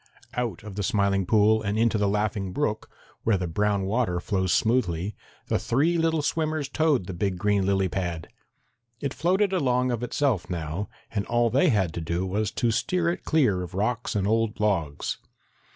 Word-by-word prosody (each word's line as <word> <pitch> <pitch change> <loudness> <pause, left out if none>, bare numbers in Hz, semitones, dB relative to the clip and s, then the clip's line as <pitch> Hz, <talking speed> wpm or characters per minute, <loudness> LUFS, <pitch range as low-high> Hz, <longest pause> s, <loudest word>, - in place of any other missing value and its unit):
Out 120 -8 -3
of 105 -2 -8
the - - -1
Smiling 100 -1 +1
Pool 110 +1 +4
and 105 0 -1
into 115 -1 +2
the 105 - +2
Laughing 105 -2 -1
Brook, 110 -5 -1 0.3
where 110 -3 +2
the 90 - -2
brown 100 +4 0
water 100 -4 0
flows 95 0 -1
smoothly, 105 -5 +1 0.3
the - - 0
three 150 +8 +1
little 165 -2 +1
swimmers 155 -1 -1
towed 150 - +1
the 95 - -6
big 95 +1 -1
green 100 +1 +1
lily 95 -1 +2
pad. 85 -3 -3 0.7
It 140 - -3
floated 190 +4 +1
along 125 -7 +1
of 120 -1 -2
itself 120 -5 0
now, 85 +3 -3 0.2
and 100 -2 -1
all 120 -1 +2
they 140 +8 +4
had 95 - +1
to 85 - -4
do 85 +3 -2
was 100 +2 -1
to 120 +1 0
steer 170 +9 +1
it 170 - -4
clear 125 -13 +2
of 90 +1 -7
rocks 115 +4 -1
and 100 -2 +1
old 110 0 +1
logs. 85 -9 -1
105 Hz, 185 wpm, -26 LUFS, 95-125 Hz, 0.7 s, Pool